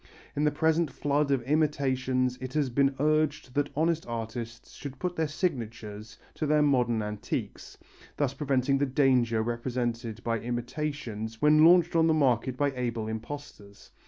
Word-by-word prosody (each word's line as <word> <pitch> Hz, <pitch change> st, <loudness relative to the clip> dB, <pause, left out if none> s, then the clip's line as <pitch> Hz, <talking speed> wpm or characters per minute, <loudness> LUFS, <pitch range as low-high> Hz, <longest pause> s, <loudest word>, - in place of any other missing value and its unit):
In 150 Hz, -, +1 dB
the 150 Hz, -, +3 dB
present 160 Hz, +1 st, +2 dB
flood 145 Hz, +2 st, 0 dB
of 135 Hz, -3 st, +1 dB
imitations 130 Hz, -3 st, +1 dB
it 130 Hz, 0 st, -6 dB
has 145 Hz, -4 st, 0 dB
been 135 Hz, +2 st, +2 dB
urged 155 Hz, -3 st, +1 dB
that 145 Hz, +1 st, 0 dB
honest 165 Hz, +2 st, +1 dB
artists 115 Hz, 0 st, -6 dB
should 140 Hz, -2 st, -8 dB
put 180 Hz, +4 st, -3 dB
their 160 Hz, -1 st, 0 dB
signatures 115 Hz, -, -4 dB, 0.2 s
to 155 Hz, -, -3 dB
their 150 Hz, 0 st, +4 dB
modern 120 Hz, -6 st, +2 dB
antiques, 105 Hz, 0 st, -5 dB, 0.4 s
thus 140 Hz, -3 st, 0 dB
preventing 135 Hz, -1 st, +1 dB
the 140 Hz, -, +1 dB
danger 125 Hz, -4 st, +2 dB
represented 120 Hz, -1 st, -3 dB
by 115 Hz, -1 st, 0 dB
imitations 120 Hz, -2 st, -4 dB
when 150 Hz, +2 st, +5 dB
launched 175 Hz, 0 st, +6 dB
on 165 Hz, 0 st, +4 dB
the 160 Hz, -, +3 dB
market 130 Hz, -3 st, +1 dB
by 145 Hz, 0 st, +1 dB
able 120 Hz, -3 st, -2 dB
imposters. 110 Hz, -3 st, -8 dB
130 Hz, 155 wpm, -28 LUFS, 120-150 Hz, 0.4 s, launched